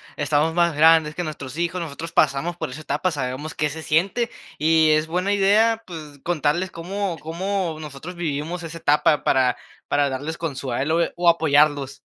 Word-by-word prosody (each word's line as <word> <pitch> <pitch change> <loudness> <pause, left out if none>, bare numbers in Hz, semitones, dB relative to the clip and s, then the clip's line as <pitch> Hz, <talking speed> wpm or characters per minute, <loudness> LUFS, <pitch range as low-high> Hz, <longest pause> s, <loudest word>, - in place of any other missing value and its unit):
estamos 150 +2 +1
más 170 -2 +2
grandes 160 0 +5
que 180 - -2
nuestros 150 -3 -7
hijos, 175 +1 -1
nosotros 165 +1 -6
pasamos 155 +3 +1
por - - -4
esa 145 +5 -8
etapa, 150 +4 -1
sabemos 140 +1 -4
qué 150 - 0
se 160 +3 -7
siente. 190 +10 +1 0.3
Y 160 +1 +4
es 155 +1 +2
buena 180 +5 0
idea, 215 +3 +3
pues, 155 -5 -9
contarles 175 +2 0
cómo 185 +1 -4
cómo 175 +1 -3
nosotros 155 +3 -8
vivimos 165 +1 -3
esa 165 0 -7
etapa 150 -1 +2
para 130 -2 +2 0.3
para 145 0 +2
darles 145 +5 -4
consuelo, 140 +1 -1
eh, - - -1
o 175 0 +4
apoyarlos. 145 -3 +2
160 Hz, 170 wpm, -22 LUFS, 145-175 Hz, 0.3 s, grandes